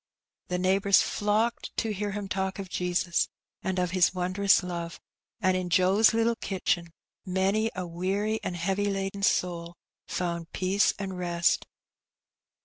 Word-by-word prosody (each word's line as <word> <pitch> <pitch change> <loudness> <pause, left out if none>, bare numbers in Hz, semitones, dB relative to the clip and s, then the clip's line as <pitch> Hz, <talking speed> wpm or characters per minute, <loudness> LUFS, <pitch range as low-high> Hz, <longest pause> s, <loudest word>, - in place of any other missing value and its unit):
The 180 - -1
neighbours 195 +2 +4
flocked 215 +3 -1
to 220 -1 0
hear 205 +1 -2
him 205 -1 -4
talk 190 +1 -2
of 190 -2 -7
Jesus 180 -1 0 0.3
and 190 -1 -2
of 180 -1 0
His 185 0 +3
wondrous 185 +2 +3
love, 170 -2 -5 0.4
and 185 -3 +2
in 185 -1 -2
Joe's 190 +5 +5
little 230 +1 +2
kitchen 175 -3 -1 0.3
many 195 +4 +1
a 185 -1 -3
weary 195 +6 -1
and 180 - -3
heavy 195 +4 0
laden 195 0 -3
soul 175 -4 0 0.3
found 170 -2 -3
peace 190 +2 +2
and 190 -2 -5
rest. 170 -1 +1
190 Hz, 140 wpm, -28 LUFS, 180-200 Hz, 0.4 s, Joe's